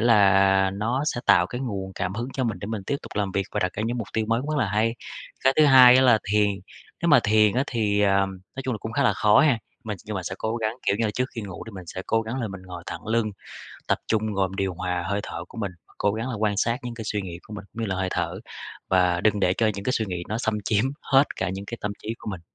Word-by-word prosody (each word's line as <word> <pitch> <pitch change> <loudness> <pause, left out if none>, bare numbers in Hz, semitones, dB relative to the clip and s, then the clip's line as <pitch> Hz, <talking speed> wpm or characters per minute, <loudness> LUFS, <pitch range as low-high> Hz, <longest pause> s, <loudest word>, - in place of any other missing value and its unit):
là 95 -4 +5
nó 115 +7 -1
sẽ 120 - -1
tạo 90 -2 +6
cái 125 +5 -6
nguồn 100 -7 -4
cảm 95 0 -3
hứng 120 +4 -3
cho 130 - -1
mình 115 -4 -2
để 100 - -6
mình 110 -2 -4
tiếp 140 - 0
tục - - -10
làm 100 -2 -1
việc 95 -1 -1
và - - -1
đặt 90 - 0
ra 105 - -3
những 120 +1 -2
mục 110 - -4
tiêu 110 -1 0
mới 115 +1 +2
cũng 145 +4 -4
rất 155 - 0
là 110 - +2
hay! 110 +3 +1 0.5
Cái 135 - +6
thứ 155 - +6
hai 130 -3 +9
á, 130 - +5
là 125 -4 +6
thiền. 105 -1 +4 0.5
Nếu 170 - +2
mà 145 -5 +7
thiền 105 0 +4
á, 130 +2 +2
thì, 105 -5 0
ờm, 100 -1 +3 0.3
nói 135 - -4
chung 130 -2 -2
là - - -5
cũng 110 +2 -6
khá - - +1
là 105 - +4
khó 105 +1 +5
ha. 140 -7 +4 0.3
Mình 105 -2 -4
nhưng 105 - -5
mà 95 - -3
sẽ 95 - -4
cố 110 +1 -2
gắng, 110 0 -2
kiểu 100 - +3
như 115 - 0
là, 105 - +1
trước 125 +4 -1
khi 115 - -4
ngủ 95 -4 -7
thì - - -7
mình 90 -3 -9
sẽ 95 - -6
cố 115 0 +2
gắng 115 +4 -4
là 110 - -2
mình 95 -1 -8
ngồi 90 -2 -9
thẳng - - -7
lưng, 110 -1 +1 0.6
tập - - +1
trung 110 -1 0
rồi 95 -1 +1
mình 95 - -9
điều 95 -2 -1
hòa 90 0 -2
hơi 100 +1 -1
thở 85 - -6
của 115 - -11
mình. 100 -4 -3 0.3
Cố 105 - +2
gắng 115 +3 -3
là 125 - -3
quan 105 -1 0
sát 115 +4 +1
những 120 - -5
cái 115 -1 -7
suy 105 -1 -2
nghĩ 85 -2 -7
của 105 - -10
mình 100 -1 -7
như 115 0 -3
là 95 - -1
hơi 95 0 -1
thở, 85 +1 -2 0.5
và 90 -2 +3
đừng 105 +1 +2
để 90 -1 +3
cho 115 - +1
những 100 0 -6
cái 125 - +1
suy 110 - 0
nghĩ 90 -2 -4
nó 110 - -2
xâm 110 -3 -1
chiếm 105 +3 +2 0.2
hết 135 +2 +3
cả - - -1
những 95 +1 -5
cái 120 - -6
tâm 105 - -2
trí 110 +2 -3
của - - -6
mình.. 95 -4 -6
105 Hz, 300 wpm, -25 LUFS, 95-115 Hz, 0.6 s, hai